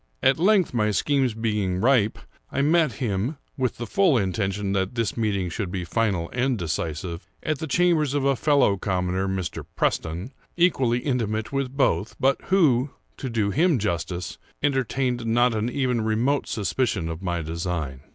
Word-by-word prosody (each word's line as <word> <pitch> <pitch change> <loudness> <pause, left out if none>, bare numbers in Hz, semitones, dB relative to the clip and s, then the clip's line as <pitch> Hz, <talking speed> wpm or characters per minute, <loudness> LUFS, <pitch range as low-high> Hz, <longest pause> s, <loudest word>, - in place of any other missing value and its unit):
At 135 - +4
length, 190 -2 +3
my 105 -3 +2
schemes 130 +2 +1
being 105 -5 -1
ripe, 115 -2 +3 0.3
I 140 - 0
met 155 -3 +3
him 110 +5 -2 0.2
(with 130 -2 -1
the 120 - -4
full 180 - +3
intention 100 0 -1
that 95 +3 -1
this 115 -4 -1
meeting 105 -5 0
should 100 +1 -3
be 90 -1 -4
final 95 -3 0
and 125 0 +1
decisive) 85 0 -4 0.2
at 155 -3 -1
the 160 - -4
chambers 155 -3 +2
of 140 -1 +1
a 140 0 +3
fellow 140 -8 +3
commoner, 95 0 -1
(Mr. 95 -2 -3
Preston,) 85 - -1 0.2
equally 130 -9 +2
intimate 110 -4 -1
with 135 -1 -2
both, 120 -6 +1
but 135 +1 +2
who, 145 -9 +3 0.3
to 130 - -4
do 110 -3 0
him 160 - +3
justice, 90 -3 -3 0.2
entertained 130 -3 0
not 120 +1 +3 0.2
even 125 -2 0
a - - -1
remote 120 +6 +1
suspicion 100 -2 -1
of 80 +1 -5
my 85 -3 -2
design. 80 -4 -3
115 Hz, 160 wpm, -24 LUFS, 95-135 Hz, 0.3 s, At